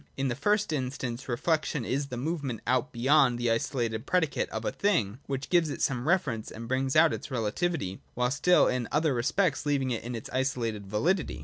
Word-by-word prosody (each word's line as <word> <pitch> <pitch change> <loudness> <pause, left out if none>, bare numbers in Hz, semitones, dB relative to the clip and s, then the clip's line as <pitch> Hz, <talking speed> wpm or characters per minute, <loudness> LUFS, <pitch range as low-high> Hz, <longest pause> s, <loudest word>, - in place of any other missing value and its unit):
In 135 0 0
the 120 - -1
first 205 - +1
instance. 130 -2 -3
Reflec 155 +6 0
tion 135 -7 -3
is 140 +2 -1
that 125 -3 -6
movement 140 -4 -3
out 125 0 +1
beyond 130 +1 +3
the 120 -1 0
isolated 115 -1 -1
predicate 170 -5 +1
of - - -5
a - - 0
thing 125 - 0
which 135 0 -4
gives 170 -3 +4
it - - -5
some 130 0 0
reference, 145 - +1
and 115 +1 -8
brings 130 +1 0
out 160 +1 +6
its - - -6
relativity, 115 - -2
while 125 +1 +1
still 180 +6 +4
in 125 -2 -1
other 150 -1 +2
respects 135 +7 +1
leaving 140 -3 0
it 115 - -2
its 115 - -6
isolated 120 -6 -1
validity. 165 - 0
130 Hz, 195 wpm, -28 LUFS, 120-155 Hz, -, out